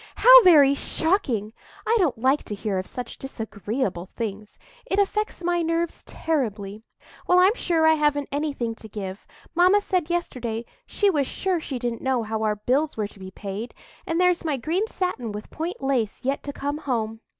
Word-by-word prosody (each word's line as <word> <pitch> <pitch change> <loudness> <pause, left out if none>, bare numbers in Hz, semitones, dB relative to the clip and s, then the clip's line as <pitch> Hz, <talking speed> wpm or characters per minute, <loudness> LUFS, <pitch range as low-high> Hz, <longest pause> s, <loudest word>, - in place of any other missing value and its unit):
"How - - +9
very 295 -7 +7
shocking! 275 - -1 0.3
I 460 - +3
don't 325 - +2
like 260 +5 +2
to 210 - -5
hear 200 -2 -2
of 185 - -5
such 250 -2 -7
disagreeable 220 -6 -4
things; 210 -2 -5 0.3
it 385 - -1
affects 405 -1 0
my 345 0 +1
nerves 330 0 -1
terribly. 215 -10 -2 0.5
Well, 360 - +5
I'm 370 +3 +6
sure 335 -8 +1
I 320 - +6
haven't 295 -2 +1
anything 280 -5 -2
to 220 -1 -13
give. 195 -2 -7 0.3
Mamma 365 +4 +5
said 365 -5 -1
yesterday 240 -10 -3 0.2
she 410 -1 +2
was 285 -6 0
sure 375 -3 -1
she 280 -4 -5
didn't 240 -1 -3
know 260 -3 0
how 220 0 -3
our 215 -1 +1
bills 260 +8 0
were 210 -2 -2
to 200 - -16
be 190 0 -8
paid; 200 +4 -6 0.3
and 330 +1 0
there's 360 -1 +3
my 305 -4 -1
green 340 - -1
satin 360 - -3
with 210 +1 -8
point 325 -2 -5
lace 250 -4 -1
yet 275 +1 0
to 285 - -3
come 285 +1 -3
home." 225 -6 -2
275 Hz, 185 wpm, -24 LUFS, 220-335 Hz, 0.5 s, How